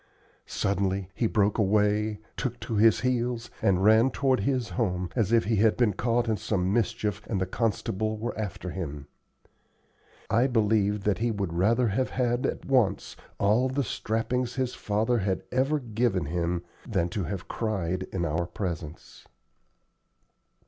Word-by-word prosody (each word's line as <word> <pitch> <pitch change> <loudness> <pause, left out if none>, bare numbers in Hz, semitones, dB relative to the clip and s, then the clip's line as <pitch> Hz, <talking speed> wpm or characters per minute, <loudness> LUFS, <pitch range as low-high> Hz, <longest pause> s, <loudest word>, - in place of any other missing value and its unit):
Suddenly 95 -1 -1
he 115 - 0
broke 105 0 +1
away, 105 +1 +2 0.2
took 125 -2 -3
to 115 - -5
his 110 +1 +5
heels, 120 -2 -1
and 95 -1 +2
ran 110 +4 +6
toward 135 -2 +1
his 125 +2 0
home, 90 -6 -1
as 110 -4 +1
if 115 -1 +4
he 110 0 0
had 110 +1 +3
been 115 -5 +3
caught 120 +3 0
in 110 -2 +1
some 95 -2 -1
mischief 110 -2 0
and 100 - -1
the 95 - 0
constable 110 +1 -1
were 120 +3 -4
after 95 -4 -4
him. 75 -6 -5 1.2
I 115 +5 +3
believe 105 -4 +1
that 105 0 +1
he 120 +1 +1
would 100 -6 -2
rather 115 +7 +2
have 130 +6 0
had 120 -1 0
at - - -4
once 125 -8 +1 0.2
all 110 +6 +3
the 140 +2 0
strappings 120 +3 -2
his 130 -2 -1
father 110 +1 0
had 95 -2 -1
ever 135 +4 +2
given 115 - 0
him 85 +2 -1 0.3
than 95 -6 +1
to 95 0 -3
have 95 +2 -5
cried 95 -5 -2
in 85 -3 -1
our 85 +2 -1
presence. 85 -7 -6
105 Hz, 155 wpm, -27 LUFS, 95-120 Hz, 1.2 s, ran